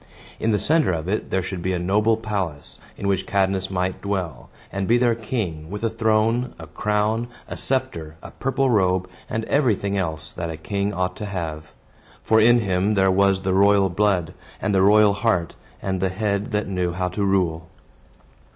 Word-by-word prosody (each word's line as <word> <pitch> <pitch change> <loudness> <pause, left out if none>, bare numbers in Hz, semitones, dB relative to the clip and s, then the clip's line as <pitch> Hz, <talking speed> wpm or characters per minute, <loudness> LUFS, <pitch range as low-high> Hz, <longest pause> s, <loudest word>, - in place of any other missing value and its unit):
In 115 - 0
the 105 - +3
center 155 - +2
of 80 -1 -3
it 105 +3 -2
there 95 - 0
should 95 0 -5
be 95 +2 -1
a - - 0
noble 105 +5 +2
palace, 100 - -4 0.2
in 100 - -3
which 95 -1 0
Cadmus 95 -1 +1
might 90 0 -2
dwell, 90 -9 -3 0.2
and 100 -1 -2
be 120 - +4
their 120 -1 +3
king, 105 - -4
with 105 +3 -6
a 115 - +1
throne, 115 +2 +1
a - - -9
crown, 105 +2 0 0.2
a - - -6
sceptre, 130 -13 -2
a - - -9
purple 135 0 0
robe, 95 -4 +2 0.2
and 110 0 -2
everything 110 -8 +1
else 80 -4 -3
that 85 -1 -4
a 80 - -5
king 100 +4 -2
ought 90 -1 -2
to 105 - -5
have; 80 -5 -5 0.5
for 110 - +4
in 120 +2 +6
him 100 +1 +1
there 95 -1 +4
was 95 0 +3
the 95 -1 +1
royal 100 0 +4
blood, 95 -3 +1 0.3
and 105 - -1
the 95 - +4
royal 105 +1 +6
heart, 95 -6 0 0.3
and 95 -2 -2
the 95 - +1
head 100 +3 -2
that 105 -1 -1
knew 90 -2 -1
how 90 +1 -1
to 100 +3 -2
rule. 85 -4 0
100 Hz, 190 wpm, -23 LUFS, 90-110 Hz, 0.5 s, in